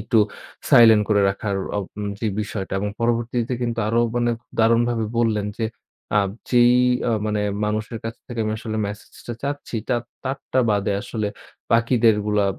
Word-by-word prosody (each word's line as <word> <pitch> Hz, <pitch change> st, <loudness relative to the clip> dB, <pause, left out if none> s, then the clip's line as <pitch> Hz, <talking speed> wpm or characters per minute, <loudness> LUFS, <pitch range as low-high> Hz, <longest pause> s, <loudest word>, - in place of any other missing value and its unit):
একটু 110 Hz, +2 st, +2 dB, 0.5 s
সাইলেন্ট 110 Hz, -3 st, +8 dB
করে 105 Hz, -1 st, +3 dB
রাখার 100 Hz, +1 st, -2 dB, 0.2 s
ওব 100 Hz, -, -1 dB, 0.4 s
যে, 115 Hz, -, -1 dB
বিষয়টা 100 Hz, -2 st, -5 dB
এবং 105 Hz, -, -1 dB
পরবর্তীতে 120 Hz, +1 st, 0 dB
কিন্তু 115 Hz, -1 st, -2 dB
আরো 115 Hz, +2 st, +2 dB, 0.2 s
মানে 120 Hz, 0 st, +2 dB, 0.3 s
দারুণভাবে 115 Hz, 0 st, +3 dB
বললেন 110 Hz, -3 st, +1 dB
যে, 115 Hz, -, 0 dB, 0.5 s
আ -, -, +6 dB, 0.3 s
যেই 120 Hz, 0 st, +6 dB, 0.4 s
অ -, -, +2 dB
মানে 105 Hz, -1 st, 0 dB, 0.2 s
মানুষের 110 Hz, +2 st, -2 dB
কাছ 115 Hz, 0 st, -4 dB
থেকে 120 Hz, -2 st, -5 dB
আমি 110 Hz, -, -1 dB
আসলে 110 Hz, -1 st, -4 dB
মেসেজটা 105 Hz, +3 st, -8 dB
চাচ্ছি 145 Hz, -3 st, -4 dB
তার 120 Hz, -2 st, +1 dB, 0.2 s
তারটা 130 Hz, 0 st, -2 dB
বাদে 100 Hz, 0 st, +1 dB
আসলে 110 Hz, -2 st, -3 dB, 0.5 s
বাকিদেরগুলা 110 Hz, -3 st, +3 dB
115 Hz, 150 wpm, -22 LUFS, 105-120 Hz, 0.5 s, সাইলেন্ট